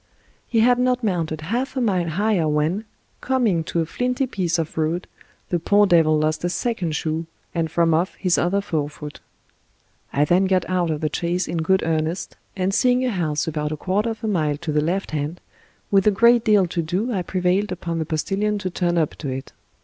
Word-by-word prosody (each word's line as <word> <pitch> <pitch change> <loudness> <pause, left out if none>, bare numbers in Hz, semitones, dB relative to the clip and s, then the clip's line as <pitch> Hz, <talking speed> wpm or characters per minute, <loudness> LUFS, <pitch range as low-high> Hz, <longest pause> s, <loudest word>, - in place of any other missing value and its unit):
He 230 -2 +2
had 245 +1 +4
not 250 0 +1
mounted 165 -6 -1
half 245 - -2
a - - +2
mile 185 -8 +1
higher 190 -1 +1
when, 155 +8 0 0.4
coming 235 -10 +1
to 170 - -1
a - - -1
flinty 250 - -1
piece 180 -8 -1
of 160 -2 -3
road, 160 +3 -1 0.4
the 175 - 0
poor 205 +5 +4
devil 165 -4 +4
lost 155 +1 0
a 175 - +1
second 180 -6 -2
shoe, 160 +2 -2 0.3
and 165 -2 -1
from 165 +1 +2
oflf 165 +4 +1
his 180 -2 +1
other 195 +3 +1
forefoot. 150 -4 -4 0.9
I 145 +1 +2
then 180 +5 +3
got 185 -2 +1
out 180 -2 0
of 155 -2 -2
the 155 - 0
chaise 175 +1 -1
in 170 - -3
good 190 +4 +2
earnest, 160 +2 -2 0.2
and 190 0 0
seeing 250 +2 +3
a 250 - 0
house 155 -6 -1
about 150 -1 -2
a 155 - -3
quarter 200 +7 0
of 225 0 -6
a - - -1
mile 155 -8 0
to 160 0 -4
the 150 0 +2
left 180 +6 -1
hand, 155 +3 -3 0.5
with 195 0 +4
a - - +9
great 235 +3 +4
deal 210 -4 +4
to 170 0 -2
do 185 +10 -1
I 190 - 0
prevailed 185 +3 0
upon 170 -2 -3
the 160 - -1
postilion 200 +7 -1
to 190 -3 -4
turn 175 -1 0
up 160 -3 +2
to 145 - -4
it. 130 +1 -6
175 Hz, 210 wpm, -22 LUFS, 160-205 Hz, 0.9 s, a